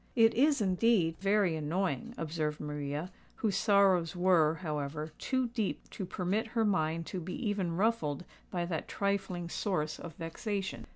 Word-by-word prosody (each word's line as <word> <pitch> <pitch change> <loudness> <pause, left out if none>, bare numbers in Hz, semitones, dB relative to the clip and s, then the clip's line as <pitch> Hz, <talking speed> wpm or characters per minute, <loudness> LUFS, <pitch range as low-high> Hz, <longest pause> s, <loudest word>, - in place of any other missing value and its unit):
"It 225 -2 +6
is, 280 0 +3
indeed, 185 -4 +3
very 195 -3 +3
annoying," 185 +9 -1
observed 155 -2 -2
Maria, 150 +3 -4 0.2
whose 210 -4 0
sorrows 195 -5 +4
were, 175 -4 +4
however, 150 -2 -3
too 260 -2 0
deep 225 -4 -2
to 190 - -5
permit 195 +7 -1
her 225 - +4
mind 165 -4 +1
to 185 - -4
be 180 +2 -5
even 190 -5 -1
ruffled 180 -8 +1 0.2
by 175 -1 -1
that 165 -3 -3
trifling 195 -3 -1
source 170 -4 -1
of 165 -3 -8
vexation. 195 +4 -4
180 Hz, 150 wpm, -32 LUFS, 160-205 Hz, 0.2 s, It